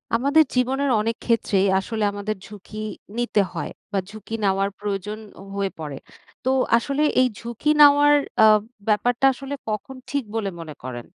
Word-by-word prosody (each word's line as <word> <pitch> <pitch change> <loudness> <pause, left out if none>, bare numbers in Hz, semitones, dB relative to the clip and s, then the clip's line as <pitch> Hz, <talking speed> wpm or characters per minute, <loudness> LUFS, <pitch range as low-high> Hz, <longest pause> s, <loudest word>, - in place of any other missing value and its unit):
আমাদের 285 +6 +4
জীবনের 270 +3 +1
অনেক 225 +2 -1
ক্ষেত্রেই 200 -4 +2
আসলে 220 +3 -3
আমাদের 205 +1 -3
ঝুঁকি 210 +1 -11 0.4
নিতে 240 -4 +2
হয় - - -4 0.2
বা 200 - +1
ঝুঁকি 215 +1 -10
নেওয়ার 195 0 +2
প্রয়োজন 210 +1 -4 0.4
হয়ে 200 -1 0
পড়ে। 145 -3 -5 0.5
তো 255 - 0 0.3
আসলে 280 +5 -1 0.2
এই 255 - +4
ঝুঁকি 235 +5 -3
নেওয়ার 290 0 +7 0.3
আব 215 -1 +6 0.3
ব্যাপারটা 240 +4 +2
আসলে 275 +2 -7 0.2
কখন 215 +5 -4
ঠিক 280 -1 -1
বলে 215 -3 -1
মনে 160 -2 -7
করেন? 120 -2 -6
215 Hz, 150 wpm, -23 LUFS, 200-260 Hz, 0.5 s, নেওয়ার